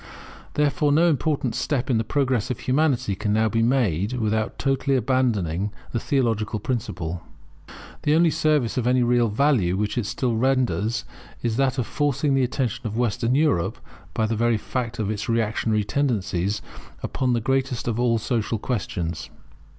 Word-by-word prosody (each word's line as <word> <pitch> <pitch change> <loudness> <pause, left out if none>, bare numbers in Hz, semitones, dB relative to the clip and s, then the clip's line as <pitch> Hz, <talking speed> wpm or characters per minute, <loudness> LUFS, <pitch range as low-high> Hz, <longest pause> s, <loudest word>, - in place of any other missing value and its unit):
Therefore 145 0 +2
no 165 +4 +4
important 145 -5 0
step 130 0 -1
in 120 -4 +2
the - - 0
progress 130 -2 0
of 125 - -3
Humanity 130 -6 +1
can 105 +2 -2
now 110 +1 +3
be 115 +1 +1
made 115 - +1
without 110 -2 -1
totally 135 0 +1
abandoning 105 -8 0 0.2
the 120 - -1
theological 115 -7 0
principle. 90 -8 -3 0.8
The 150 +1 +2
only 165 0 +4
service 155 -7 +1
of 120 -1 0
any 125 0 +3
real 120 0 +3
value 105 -7 +2
which 105 +3 -1
it 105 - -2
still 120 0 -1
renders, 125 -3 +1 0.4
is 115 -2 0
that 135 -1 +1
of 125 - 0
forcing 145 -1 0
the 135 - +3
attention 125 -3 -1
of 110 +1 -5
Western 120 +1 +1
Europe, 145 - +1 0.4
by 110 - +1
the 110 +1 -1
very 115 +1 +2
fact 120 +1 -4
of 105 -1 -1
its 110 +2 -4
reactionary 110 -1 +1
tendencies, 105 -5 -1 0.4
upon 130 -2 0
the 120 - +2
greatest 135 +1 -1
of 115 -1 -1
all 120 -1 +3
social 115 0 -1
questions. 100 -8 -3
120 Hz, 165 wpm, -24 LUFS, 110-135 Hz, 0.8 s, no